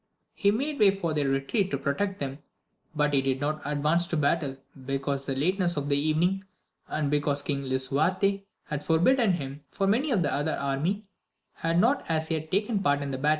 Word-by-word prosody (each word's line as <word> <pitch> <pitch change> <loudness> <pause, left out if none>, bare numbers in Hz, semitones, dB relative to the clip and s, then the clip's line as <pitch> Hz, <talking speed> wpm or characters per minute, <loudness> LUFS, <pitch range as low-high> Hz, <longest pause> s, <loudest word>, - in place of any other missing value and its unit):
He 200 - +2
made 280 +8 -1
way 205 - +7
retreat 155 - 0
to 140 - -1
protect 190 +9 -1
them, 140 0 -4 0.6
but 150 -1 +1
he 135 - +4
did 135 -1 0
not 150 +2 -2
adi 150 +4 +1
battle, 145 -2 +1 0.3
because 135 0 -1
of 135 - 0
the - - -3
lateness 180 0 +1
of 145 0 -2
the 140 - +3
evening, 160 +6 +1 0.8
cause 145 -1 0
King 140 -2 -2
Lisuarte 165 +10 +1 0.2
had 150 -1 -4
forbidden 195 - +3
him, 140 -3 -5
for 195 - -1
the 245 +10 +2 0.2
other 145 +2 0
army 155 +10 -1 0.5
had 165 +1 -1
not 260 +8 +3
as 160 0 0
yet 155 -1 -2
taken 205 +3 +1
part 145 -4 +2
in 140 - -4
the 130 - -3
IJ? 145 +3 +2
155 Hz, 175 wpm, -27 LUFS, 140-195 Hz, 0.8 s, way